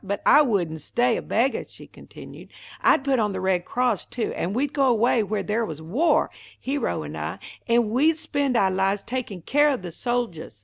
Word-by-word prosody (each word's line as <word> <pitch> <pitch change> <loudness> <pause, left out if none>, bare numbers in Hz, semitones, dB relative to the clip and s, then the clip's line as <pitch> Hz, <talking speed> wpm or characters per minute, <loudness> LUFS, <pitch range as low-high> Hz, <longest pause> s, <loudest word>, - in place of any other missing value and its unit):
But 200 +1 -4
I 295 - +7
wouldn't 175 - 0
stay 240 - +1
a - - -3
beggah," 245 +5 0
she - - -14
continued. - - -13 0.3
"I'd - - +4
put 270 -2 +1
on 210 -2 0
the 190 - -3
Red 185 -1 0
Cross 245 -5 -1
too, 240 - -3
and 185 +5 -3
we'd 280 +3 -1
go 275 -2 +2
away 235 -1 +3
where 210 0 -2
there 220 +2 -1
was 160 -8 -5
war, 220 - +1 0.3
Hero 280 +2 -2
and - - -7
I, - - -4 0.3
and 230 -2 +2
we'd 305 +7 +3
spend 285 -5 -1
ou' 190 -3 +3
lives 195 +2 0
takin' 230 -8 -5
care 290 - +3
of 260 -9 -2
the 175 - -5
soldiahs. 230 - -3
230 Hz, 205 wpm, -24 LUFS, 195-260 Hz, 0.3 s, I